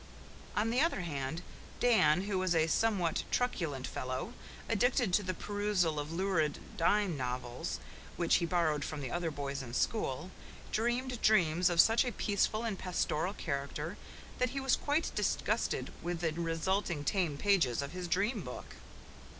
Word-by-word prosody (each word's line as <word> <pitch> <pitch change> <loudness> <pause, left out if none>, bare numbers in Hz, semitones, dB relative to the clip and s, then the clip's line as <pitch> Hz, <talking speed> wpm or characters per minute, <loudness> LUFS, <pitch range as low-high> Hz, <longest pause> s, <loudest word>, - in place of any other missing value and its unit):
On 220 +2 +1
the 250 +3 +3
other 330 - +2
hand, 150 0 -3 0.4
Dan, 185 -9 +4
who 200 -2 -1
was 185 -2 +1
a 160 -1 +4
somewhat 180 -1 +1
truculent 165 - -1
fellow, 130 - -4 0.3
addicted 240 -2 +2
to 205 - +5
the 185 -2 -3
perusal 205 -7 0
of 145 +1 -4
lurid 165 -4 +1 0.2
dime 195 +1 +2
novels 125 -2 -3 0.4
which 170 -1 +4
he 170 - -1
borrowed 160 -4 +1
from 150 0 -4
the 130 -3 -4
other 175 -1 -1
boys 140 -2 -4
in 120 -2 -7
school, 175 - -1 0.4
dreamed 240 +2 0
dreams 180 -4 +4
of 170 -1 -1
such 225 +7 +6
a 250 - -2
peaceful 210 +1 0
and 220 -5 -2
pastoral 180 0 -1
character 150 +3 -3 0.4
that 250 0 +2
he 275 +2 -3
was 270 -2 +3
quite 300 +3 0
disgusted - - 0
with 175 -1 -3
the 160 -2 0
resulting 170 0 -1
tame 170 -3 0
pages 160 - +2
of 140 - -6
his 180 0 -5
dream 200 +6 +1
book. 125 -5 -8
175 Hz, 160 wpm, -33 LUFS, 150-210 Hz, 0.4 s, such